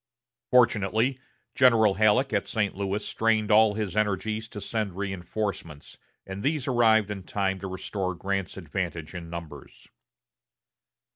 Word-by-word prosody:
Fortunately, 120 +1 +3 0.3
General 115 -6 +5
Halleck 110 +6 +3
at 100 - 0
St. 105 -3 -1
Louis 100 +1 -3
strained 110 -1 +1
all 105 -1 +5
his 105 -4 -3
energies 105 +1 -1
to 105 - -8
send 105 -3 -3
reinforcements, 95 -5 -5 0.3
and 95 +1 -6
these 145 +1 -1
arrived 110 -4 +3
in 100 -2 -5
time 95 +1 -2
to 95 - -5
restore 95 0 -4
Grant's 95 0 -3
advantage 85 -2 -4
in 85 -2 -7
numbers. 85 -2 -10
100 Hz, 130 wpm, -26 LUFS, 95-110 Hz, 0.3 s, General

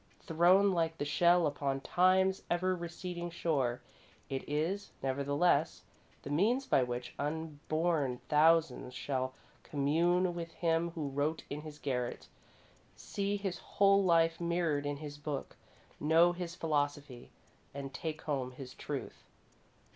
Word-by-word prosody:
Thrown 180 +5 +4
like 165 -2 0
the 145 - -2
shell 175 +3 +4
upon 140 -2 -1
Time's 190 +4 +3
ever 185 +2 +1
receding 175 0 -5
shore, 140 -8 -1 0.5
it 135 -1 -3
is, 165 +7 -1
nevertheless, 140 +4 +1 0.4
the 140 - -6
means 225 - +2
by 135 - +3
which 125 0 -3
unborn 155 -2 -1
thousands 155 -4 +3
shall 130 -1 -2 0.3
commune 170 +5 +1
with 170 -1 -6
him 165 0 +1
who 150 -4 -3
wrote 145 +4 -1
in 145 +1 -4
his 150 -1 -9
garret, 125 -4 -3 0.7
see 200 0 -2
his 195 -3 -4
whole 200 0 +3
life 165 -2 +3
mirrored 170 -4 0
in 145 0 -2
his 145 0 -8
book, 145 -2 -5 0.4
know 165 +3 +5
his 175 -1 -5
philosophy, 145 -5 -2 0.4
and 135 -1 -7
take 155 -1 -5
home 130 -4 -2
his 130 0 -9
truth. - - -6
160 Hz, 130 wpm, -33 LUFS, 145-175 Hz, 0.7 s, know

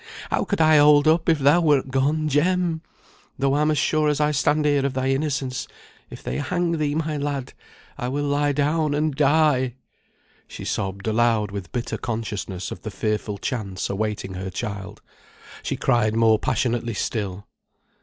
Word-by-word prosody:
How - - +1
could 200 - -2
I 155 -1 +6
hold 145 0 +6
up 160 +1 +3
if 160 - +4
thou 145 +5 +4
wert 145 -5 +2
gone, 145 +4 +1
Jem? 165 +2 +1 0.6
Though 135 0 +1
I'm 150 +2 +2
as 155 - +1
sure 155 +1 +2
as 150 - 0
I 150 0 +2
stand 150 +1 +1
here 145 -2 +2
of 140 -1 -1
thy 130 0 0
innocence, 135 -2 -1 0.4
if - - -11
they - - -3
hang 170 +1 -1
thee, 145 -1 0
my 155 -1 -1
lad, 140 -2 -3 0.5
I 125 - -2
will 140 +3 -2
lie 145 0 +1
down 150 +1 +1
and 150 0 0
die!" 145 -4 +3 0.7
She - - -9
sobbed 95 0 -3
aloud 110 -2 +2
with 100 -3 -6
bitter 120 -1 -3
consciousness 105 -5 -4
of - - -7
the 110 - -5
fearful 105 -1 -2
chance 100 -5 -3
awaiting 105 -1 -3
her 95 +1 -5
child. 100 0 -6 0.6
She - - -2
cried 110 -2 +2
more 110 -1 +4
passionately 120 -2 -1
still. 100 -3 -3
135 Hz, 170 wpm, -23 LUFS, 110-150 Hz, 0.7 s, I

